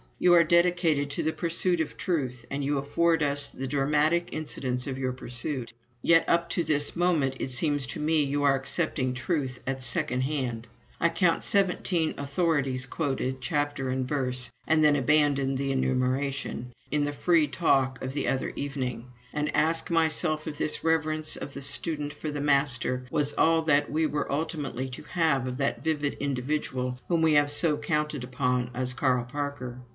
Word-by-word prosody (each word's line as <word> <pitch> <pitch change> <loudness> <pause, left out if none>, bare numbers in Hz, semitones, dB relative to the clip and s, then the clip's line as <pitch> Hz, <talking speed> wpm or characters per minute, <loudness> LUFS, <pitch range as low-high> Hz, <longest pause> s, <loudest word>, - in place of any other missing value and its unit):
You 175 -1 +5
are 170 - +7
dedicated 170 -3 +3
to - - -2
the 160 - 0
pursuit 175 +1 0
of 160 - -3
Truth, 130 -9 -2
and 140 +1 -2
you 145 +1 0
afford 160 +3 +2
us 145 0 0
the 135 - -5
dramatic 150 +5 +2
incidents 130 -5 -3
of 135 -2 -4
your 130 -1 -1
pursuit. 125 0 -4 0.3
Yet 165 0 +5
up 170 0 +3
to 170 - 0
this 145 -2 0
moment 165 -7 +2
it - - -2
seems 145 +1 0
to - - -5
me 155 0 +2
you 145 +1 -1
are 140 -1 +5
accepting 135 -1 -1
Truth 130 -1 -2
at 135 0 -3
second 125 +1 -1
hand. 130 -5 -2 0.3
I 170 - +3
counted 170 -1 +2
seventeen 180 -4 +1
"authorities" 140 -3 0
quoted, 135 -3 -2
chapter 145 -2 -1
and 130 0 -1
verse 125 -3 -1 0.2
(and 160 -1 +4
then 150 -1 +5
abandoned 140 -1 +3
the 135 0 -1
enumeration), 130 -1 -1 0.2
in 150 -1 +2
the 145 0 -1
free 165 0 +3
talk 135 -4 +1
of 130 0 -3
the 140 - -1
other 135 - -1
evening; 130 -4 -4 0.3
and 150 0 -1
asked 160 +2 +1
myself 160 -1 +1
if 150 -2 -5
this - - -1
reverence 155 -1 +1
of 140 - -7
the 140 - -6
student 145 +1 -1
for 155 +1 -5
the 145 -1 -3
master, 135 -3 +1
was 145 +1 +1
all 165 0 +3
that 145 -2 +2
we 160 +2 +1
were 150 -1 -2
ultimately 145 -4 -2
to 125 - -8
have 150 -5 +1
of 125 0 -4
that 140 0 -1
vivid 150 -3 0
individual 130 -2 -2
whom 170 -2 +1
we 160 -1 +4
had 145 -1 +4
so 150 +1 +1
counted 150 -2 -1
upon 125 -1 0
as 125 0 -1
Carl 125 -1 +1
Parker? 130 -2 -5
145 Hz, 175 wpm, -27 LUFS, 130-155 Hz, 0.3 s, are